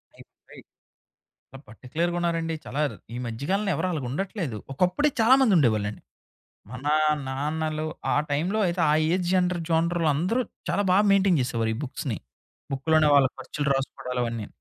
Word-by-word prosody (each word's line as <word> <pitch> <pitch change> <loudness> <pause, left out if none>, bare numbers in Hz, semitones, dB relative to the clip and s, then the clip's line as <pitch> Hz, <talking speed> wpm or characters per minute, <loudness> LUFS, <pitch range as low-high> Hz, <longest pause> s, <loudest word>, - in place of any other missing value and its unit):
అయ్య‌ - - -14
బాబోయి! - - -16 1.1
పార్టిక్యులర్‌గా 160 +10 -3
ఉన్నారండి. 165 -1 -1
చాలా 140 - -3
ర్ - - -11 0.2
ఈ - - -4
మధ్య 115 +2 -6
కాలంలో 200 +1 +1
ఎవరు 185 - -1
అలాగా 145 -6 -3
ఉండట్లేదు. 170 - -3
ఒకప్పుడే 180 - +2
చాలామందుండేవాళ్ళండి. 165 - +3 0.7
మన 130 +2 -8 0.4
నాన్నలు 155 +3 -2 0.3
ఆ - - +1
టైమ్ంలో 170 +9 0
అయితే, 175 +1 -1
ఆ - - +4 0.2
ఏజ్ 180 -1 0
జెంటర్ 180 -2 +1
జానర్‌లో 165 0 +2
అందరూ 200 - +1 0.3
చాలా 205 - +1
బాగా 200 +3 +4
మెయింటైన్ 195 -4 +4
చేసేవారు 115 -2 -1
ఈ - - -6
బుక్స్‌ని. 130 - -4 0.6
బక్కులోనే 155 +3 +3
వాళ్ళ 140 -2 +6
ఖర్చులు 150 0 -3
రాసుకోడాలవన్నీ. 125 -4 -3
160 Hz, 140 wpm, -25 LUFS, 130-180 Hz, 1.1 s, వాళ్ళ